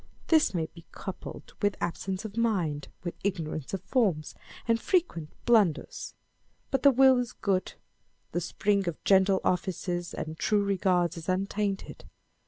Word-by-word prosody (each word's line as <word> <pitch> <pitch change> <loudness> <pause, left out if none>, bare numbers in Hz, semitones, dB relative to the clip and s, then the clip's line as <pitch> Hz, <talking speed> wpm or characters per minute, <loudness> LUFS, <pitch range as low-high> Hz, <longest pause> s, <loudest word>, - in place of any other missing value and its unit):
This 315 - +4
may 165 -2 +1
be 165 +1 -14
coupled 190 - -8
with 205 -1 +1
absence 185 +3 -3
of 210 -1 -7
mind, 180 -11 0 0.2
with 175 - -3
ignorance 165 -7 -2
of 190 -1 -4
forms, 190 - +1 0.3
and 230 0 +2
fre 375 - +4
quent 170 - -3 0.2
blunders. 210 -10 +2 0.6
But 270 -2 +1
the 280 - +8
will 265 -1 +6
is 245 -1 -3
good. 190 -2 -1 0.6
The 175 - -1
spring 200 +2 0
of 170 - -4
gentle 190 0 +4
offices 175 -1 -1
and 160 0 -5
true 210 -1 +2
regards 180 -4 +1
is 165 +2 -6
untainted. 195 +1 -2
190 Hz, 150 wpm, -29 LUFS, 175-215 Hz, 0.6 s, the